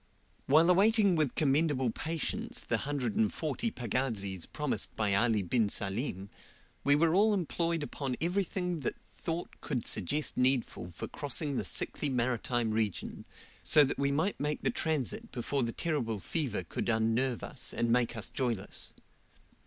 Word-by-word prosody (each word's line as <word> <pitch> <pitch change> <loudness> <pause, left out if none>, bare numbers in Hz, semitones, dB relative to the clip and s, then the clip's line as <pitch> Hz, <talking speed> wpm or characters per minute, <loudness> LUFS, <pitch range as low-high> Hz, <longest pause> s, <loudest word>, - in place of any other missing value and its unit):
While 155 +5 +6
awaiting 200 0 +5
with 155 -5 +1
commendable 140 -4 +2
patience 160 +5 -3
the - - -1
140 140 - -1
pagazis 110 - -2
promised - - -3
by 105 -2 +1
Ali 110 0 +3
bin 110 +3 +1
Salim 100 -1 -2 0.5
we 145 0 +5
were 160 +2 +3
all 210 +3 +4
employed 170 -3 -1
upon 135 -3 -3
everything 180 0 -1
that 135 - -2
thought 170 0 -5
could 125 -4 -2
suggest 145 - 0
needful 125 -8 +2
for 85 - -6
crossing 145 0 -1
the - - 0
sickly 150 - -1
maritime 120 -2 0
region, 110 -4 -2 0.4
so 150 - +6
that 135 - -1
we 140 0 +2
might 160 +8 0
make 150 +1 -2
the - - +2
transit 160 - -1
before 135 +3 -1
the 115 -1 0
terrible 115 -8 -1
fever 125 - -1
could 85 - -3
unnerve 115 +2 +1
us, - - -5
and 115 0 0
make 120 -1 +2
us 110 - -1
joyless. 120 -7 -2
135 Hz, 145 wpm, -31 LUFS, 115-160 Hz, 0.5 s, While